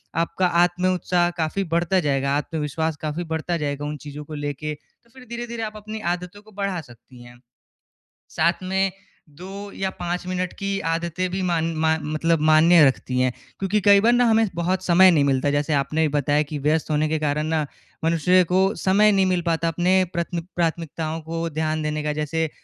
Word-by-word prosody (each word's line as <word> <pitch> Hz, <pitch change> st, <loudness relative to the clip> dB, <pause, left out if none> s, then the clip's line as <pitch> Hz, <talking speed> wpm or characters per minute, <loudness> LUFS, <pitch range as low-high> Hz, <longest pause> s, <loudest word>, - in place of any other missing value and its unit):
आपका 170 Hz, +2 st, +1 dB, 0.2 s
आत्म-उत्साह 180 Hz, 0 st, +1 dB
काफ़ी 160 Hz, +5 st, -1 dB
बढ़ता 175 Hz, +2 st, +2 dB
जाएगा, 140 Hz, -2 st, 0 dB
आत्मविश्वास 160 Hz, +1 st, -2 dB
काफ़ी 155 Hz, +3 st, -3 dB
बढ़ता 165 Hz, +2 st, -1 dB
जाएगा 145 Hz, -1 st, -3 dB
उन 150 Hz, 0 st, -4 dB
चीज़ों 145 Hz, +1 st, -7 dB
को 155 Hz, -, -10 dB
लेके, 145 Hz, 0 st, -4 dB
तो 235 Hz, +9 st, -32 dB
फ़िर 260 Hz, -1 st, -14 dB
धीरे-धीरे 235 Hz, -1 st, -5 dB
आप 215 Hz, -1 st, -5 dB
अपनी 215 Hz, +1 st, -7 dB, 0.2 s
आदतों 180 Hz, +3 st, -11 dB
को 215 Hz, +1 st, -19 dB
बढ़ा 200 Hz, -3 st, -3 dB
सकती 120 Hz, -2 st, -16 dB
हैं। 120 Hz, 0 st, -15 dB, 0.9 s
साथ 170 Hz, +3 st, 0 dB
में 190 Hz, +1 st, 0 dB, 0.4 s
2 195 Hz, +6 st, -9 dB
या 190 Hz, 0 st, -1 dB
5 175 Hz, -1 st, -4 dB
मिनट 185 Hz, -1 st, -2 dB
की 195 Hz, 0 st, -2 dB
आदतें 170 Hz, +2 st, -2 dB
भी 190 Hz, +1 st, -2 dB
मान 165 Hz, -2 st, +1 dB, 0.2 s
मा 160 Hz, 0 st, +3 dB
मतलब 155 Hz, +2 st, 0 dB
मान्य 160 Hz, 0 st, +6 dB
रखती 130 Hz, -1 st, 0 dB
हैं। 130 Hz, 0 st, +2 dB, 0.3 s
क्योंकि 195 Hz, +2 st, 0 dB
कई 200 Hz, +1 st, +6 dB
बार 235 Hz, +3 st, +4 dB
ना 245 Hz, 0 st, +4 dB
हमें 225 Hz, -1 st, +3 dB
बहुत 180 Hz, +2 st, -1 dB
समय 185 Hz, +1 st, +6 dB
नहीं 150 Hz, -4 st, +3 dB
मिलता 135 Hz, 0 st, +1 dB
है -, -, +2 dB
जैसे 145 Hz, +1 st, 0 dB
आपने 155 Hz, +3 st, +1 dB
बताया 145 Hz, +1 st, +2 dB
कि 150 Hz, -, -4 dB
व्यस्त 155 Hz, +3 st, 0 dB
होने 150 Hz, 0 st, +1 dB
के 160 Hz, -, 0 dB
कारण 150 Hz, 0 st, -1 dB
ना, 155 Hz, -1 st, 0 dB, 0.4 s
मनुष्य 170 Hz, +3 st, +3 dB
को 185 Hz, +1 st, +4 dB
समय 210 Hz, +3 st, +3 dB
नहीं 195 Hz, -1 st, +3 dB
मिल 180 Hz, -1 st, +1 dB
पाता 165 Hz, -1 st, 0 dB
अपने 180 Hz, +3 st, +2 dB
प्रथमिक 170 Hz, -1 st, -3 dB
प्राथमिकताओं 165 Hz, -1 st, -2 dB
को 165 Hz, +1 st, -4 dB
ध्यान 155 Hz, 0 st, -2 dB
देने 150 Hz, 0 st, -2 dB
का 150 Hz, 0 st, -1 dB
जैसे 155 Hz, +1 st, -2 dB
165 Hz, 190 wpm, -23 LUFS, 150-185 Hz, 0.9 s, मान्य